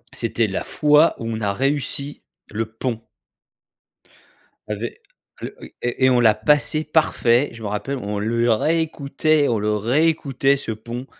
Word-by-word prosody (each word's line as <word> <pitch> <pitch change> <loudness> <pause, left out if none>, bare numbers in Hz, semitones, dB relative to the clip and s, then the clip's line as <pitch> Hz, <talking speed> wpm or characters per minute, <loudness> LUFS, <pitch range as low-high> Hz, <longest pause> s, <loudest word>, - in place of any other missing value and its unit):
C'était 115 -1 -1
la 95 - -3
fois 150 +2 +3
où 115 - -5
on 110 -1 -3
a 100 -1 0
réussi 140 +2 -2 0.3
le 110 +2 -2
pont 115 0 -4 1.6
ave 105 +1 -4
heu, 120 - -1 0.7
oui - - -12
et 120 +2 0
et - - +6
on 125 -1 +3
l'a 110 -3 +5
passé 150 +6 +2
parfait, 145 -4 +2
je 115 - -11
me - - -3
rappelle, 120 +7 -3
on 105 -3 -4
le 115 +2 +1
réécoutait, 155 +2 +1
on 115 -3 +1
le 105 0 0
réécoutait 140 +3 +1
ce 125 - -5
pont. 120 +4 -6
120 Hz, 155 wpm, -21 LUFS, 110-145 Hz, 1.6 s, et